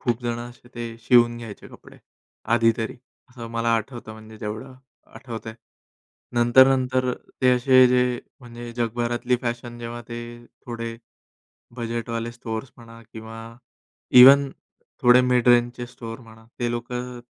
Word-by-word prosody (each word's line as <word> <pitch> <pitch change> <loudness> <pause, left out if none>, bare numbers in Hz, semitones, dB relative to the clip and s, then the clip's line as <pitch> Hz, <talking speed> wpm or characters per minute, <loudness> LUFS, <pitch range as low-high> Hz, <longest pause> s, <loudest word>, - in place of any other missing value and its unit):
खूप 120 -1 -1
जणं 120 0 -3
असे 120 0 -17
ते 115 -1 -6
शिवून 120 0 +4
घ्यायचे 115 -3 -10
कपडे - - -16 0.6
आधी 115 -1 +4
तरी 115 -2 -4 0.3
असं 120 -2 -9
मला 115 0 -1
आठवतं 115 0 -6
म्हणजे 110 0 -13
जेवढं 110 +5 -6 0.4
आठवतंय. 115 -3 -8 0.8
नंतर-नंतर 130 +1 +4 0.3
ते 130 - +6
असे 130 +1 +6
जे 125 -1 +1 0.2
म्हणजे 120 -1 -9
जगभरातली 120 +1 -1
फॅशन 120 0 -4
जेव्हा 120 0 -6
ते 120 0 -6 0.5
थोडे 115 -1 -5 0.8
बजेटवाले 115 0 -4
स्टोअर्स 120 +1 -6
म्हणा 115 -1 -14
किंवा 110 0 -9 0.8
इव्हन 140 +2 +8 0.5
थोडे 125 +1 +7
मिड 125 -1 +2
रेंजचे 120 0 +3
स्टोअर 115 -1 -9
म्हणा, 115 -1 -16
ते 120 -1 -1
लोकं 125 +1 -5
120 Hz, 130 wpm, -23 LUFS, 115-125 Hz, 0.8 s, इव्हन